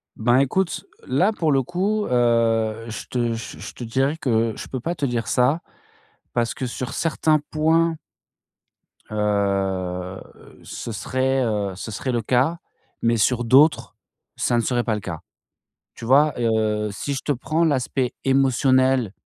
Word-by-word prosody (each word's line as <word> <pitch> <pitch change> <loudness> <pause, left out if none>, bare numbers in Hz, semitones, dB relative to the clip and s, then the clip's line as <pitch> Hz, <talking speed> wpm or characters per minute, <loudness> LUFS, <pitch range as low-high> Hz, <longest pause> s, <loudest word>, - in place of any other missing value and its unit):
Ben, 120 +3 +2
écoute, 165 +7 0 0.2
là 175 +12 +2
pour 160 -7 0
le 135 -1 +3
coup, 200 - -1
heu, 115 -2 +1
je 110 - -7
te 120 -2 -1
je 115 0 -7
je - - -8
te - - -8
dirais 135 +6 0
que 115 -5 +1
je - - -8
peux 130 - -4
pas 165 +8 -2
te 150 -4 -2
dire 115 -4 -2
ça 130 +9 +2 0.7
parce 120 -1 0
que 130 -2 -4
sur 125 +1 -5
certains 155 -1 +1
points 160 +2 +2 1.2
heu, 95 -3 -1 0.4
ce 115 - -6
serait, 130 +4 0
heu, 105 -4 -1
ce 110 +4 -7
serait 125 +6 -3
le 120 -1 0
cas, 130 +9 +1 0.4
mais 115 0 +2
sur 120 +2 +2
d'autres, 145 +6 +4 0.4
ça 120 - +1
ne 120 - +3
serait 120 +1 0
pas 110 -3 0
le 105 - -5
cas. - - -6 0.7
Tu 115 - -9
vois, 145 +4 +5
heu, 110 -2 +1
si 140 +8 -4
je 135 - -3
te 145 - -1
prends 155 +5 0
l'aspect 130 -3 0
émotionnel 130 -3 +3
125 Hz, 160 wpm, -22 LUFS, 110-140 Hz, 1.2 s, vois